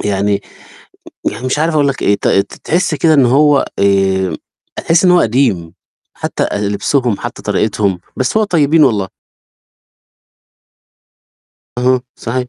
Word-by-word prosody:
يعني 100 0 0 0.9
يعني 125 - -6
مش 130 +3 -1
عارف 160 +1 0
أقول 145 -2 +2
لك 135 - -3
إيه، 100 - +3
ت - - -2
ت 100 - 0
تحس 175 0 0
كده 155 +2 +2
إن 135 -3 +4
هو 140 +3 +3
آآ، 95 -3 +1 0.4
تحس 165 +2 +1
إن 180 - +5
هو 180 0 +5
قديم 110 -9 0 0.4
حتى - - -4
أ - - -3
لبسُهم 105 +3 -1
حتى - - -7
طريقتهم، 100 -4 -1 0.2
بس 130 +9 -1
هو 220 - +3
طيبين 160 -4 +3
والله. 105 -7 0 2.7
اهم، 125 +1 +2 0.2
صحيح. 125 +2 -3
125 Hz, 140 wpm, -14 LUFS, 100-150 Hz, 2.7 s, إن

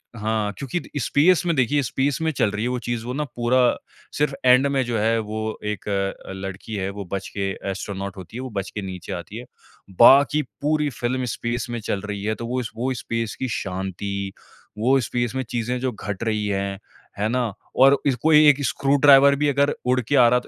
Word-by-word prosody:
हाँ, 110 -1 -1
क्योंकि 140 +5 -3
the - - -12
space 160 +9 +4
में 170 -2 +1
देखिए 140 +2 +2
स्पेस 130 +3 0
में 160 0 +1
चल 110 -8 +1
रही 105 +1 -3
है 120 - 0
वो 125 - -1
चीज़ 120 -2 -3
वो 125 - -4
ना 150 +3 -1
पूरा 120 +2 +2 0.6
सिर्फ़ 145 -1 +1
एंड 125 +2 +6
में 140 -1 +1
जो 120 -1 -1
है 110 +2 +2
वो 110 0 -4
एक 105 - -7 0.5
लड़की 95 +3 -6
है 95 -1 -2
वो 100 0 -7
बच 95 0 -3
के 100 -1 -1 0.2
एस्ट्रोनॉट 100 0 -5
होती 95 +5 -9
है - - -4
वो 130 - -5
बच 100 -4 -4
के 105 - -5
नीचे 95 -2 -6
आती 90 +5 -7
है। 120 - -8 0.5
बाकी 140 +5 +7 0.2
पूरी 150 0 +1
फ़िल्म 125 0 -2
स्पेस 120 +1 -3
में 120 0 -3
चल 100 -2 -3
रही 100 -1 -5
है 110 +1 -1
तो 115 - -6
वो 125 +1 -1
स 110 - -6
वो 125 +3 -1
स्पेस 115 -2 -3
की 130 - -1
शांति, 95 0 -4 0.4
वो 130 +5 +3
स्पेस 120 0 -2
में 130 - -1
चीज़ें 120 +1 -2
जो 130 0 -1
घट 105 -2 -5
रही 110 -2 -1
हैं। 100 -1 -2 0.4
है 105 +2 +1
ना? 120 -3 -1 0.2
और 135 +2 +6 0.2
कोई 155 -1 +6
1 145 0 +3
स्क्रू 140 +3 +1
ड्राइवर 140 0 +7
भी 145 +1 0
अगर 140 +1 +2
उड़ 125 +1 +2
के 125 +5 -1
आ 125 -3 +7
रहा 125 - +3
है - - -1
120 Hz, 215 wpm, -23 LUFS, 105-135 Hz, 0.6 s, बाकी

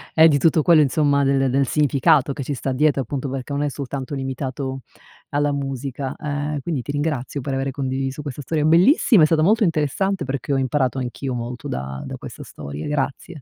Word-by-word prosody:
e 160 0 +8
di 145 - +3
tutto 155 +2 +3
quello 170 0 +6
insomma 140 0 +2
del 135 -1 +2
del 135 +1 +2
significato 145 0 +3
che 135 - -4
ci 145 - -2
sta 135 0 -3
dietro, 140 +1 +2
appunto 135 +2 -4
perché 135 +1 -5
non 140 +1 -1
è 145 - 0
soltanto 140 0 -5
limitato 135 0 -4 0.5
alla 145 0 +1
musica, 135 -1 -4
ehm, 145 0 -3
quindi 155 -5 -2
ti 145 - -5
ringrazio 145 -2 -2
per 135 +1 -4
avere 135 0 -1
condiviso 135 +1 -3
questa 145 -1 -6
storia 150 +2 -1
bellissima, 180 - +5
è - - +8
stata 155 0 +2
molto 215 +5 +4
interessante 170 +4 0
perché 140 0 -3
ho - - +2
imparato 130 0 0
anch'io 130 +1 -4
molto 120 0 -5
da 65 +1 -5
da - - -6
questa - - -9
storia, 70 +2 -7
grazie. 145 +3 -3
140 Hz, 195 wpm, -22 LUFS, 130-150 Hz, 0.5 s, e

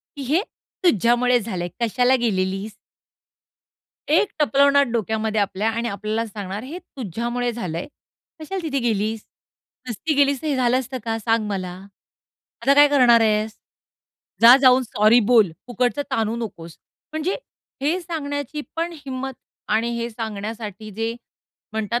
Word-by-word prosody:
की 285 - -7
"हे 300 +8 +2 0.4
तुझ्यामुळे 245 - +3
झालंय. 190 -6 -4
कशाला 245 +3 +3
गेलेलीस?" 195 -2 -1 1.4
एक 420 - +4
टपलवणार 280 -1 +4
डोक्यामध्ये 220 -1 0
आपल्या 200 +2 0
आणि 230 +1 -2
आपल्याला 215 +2 -2
सांगणार, 205 -1 -6
"हे 295 +8 -7
तुझ्यामुळे 245 - -3
झालंय. 180 -7 -4 0.5
कशाला 375 +5 -4
तिथे 295 -4 -1
गेलीस? 220 -2 -1 0.6
नुसती 300 +7 -2
गेलीस 280 -1 +3
तर - - -4
हे 290 -3 +1
झालं 250 0 +3
असतं 260 0 -4
का? 225 -1 -1
सांग 225 -1 0
मला. 185 -3 -3 0.9
आता 275 +4 +4
काय 290 +1 +7
करणार 250 -5 +5
आहेस? 215 0 +1 0.8
जा 235 +2 +10
जाऊन 255 0 +6
सॉरी 220 0 +4
बोल. 220 -7 +6 0.2
फुकटचं 250 +3 0
ताणू 225 0 0
नकोस." 170 -8 -7 0.4
म्हणजे 315 +5 -1 0.5
हे 320 +6 +1
सांगण्याची 295 -4 -4 0.2
पण 335 +1 -1
हिम्मत, 265 0 -4 0.4
आणि 225 +2 +1
हे 235 0 -2
सांगण्यासाठी 215 -1 -6
जे 225 +3 -2 0.6
म्हणतात 220 +2 -1
235 Hz, 135 wpm, -22 LUFS, 215-270 Hz, 1.4 s, जा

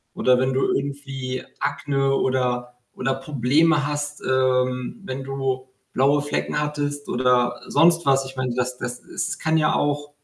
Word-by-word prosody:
Oder 125 0 +4
wenn 130 +1 +1
du 130 - +1
irgendwie 135 -2 -4 0.2
Akne 135 -1 0
oder 125 -2 0 0.2
oder 135 +1 0
Probleme 145 +3 +2
hast, 145 0 -3
ähm, 130 - +1
wenn 135 -3 -4
du 135 -1 -2 0.3
blaue 140 +3 +3
Flecken 145 +1 -2
hattest 145 -1 -3
oder 125 -1 +2
sonst 170 0 +4
was. 135 0 +3
Ich 135 0 -9
meine, 130 -2 -2
das 125 0 -1
das 125 0 -5
es - - -4
kann 160 0 +2
ja 155 -1 +2
auch 145 0 0
135 Hz, 150 wpm, -23 LUFS, 130-145 Hz, 0.3 s, Oder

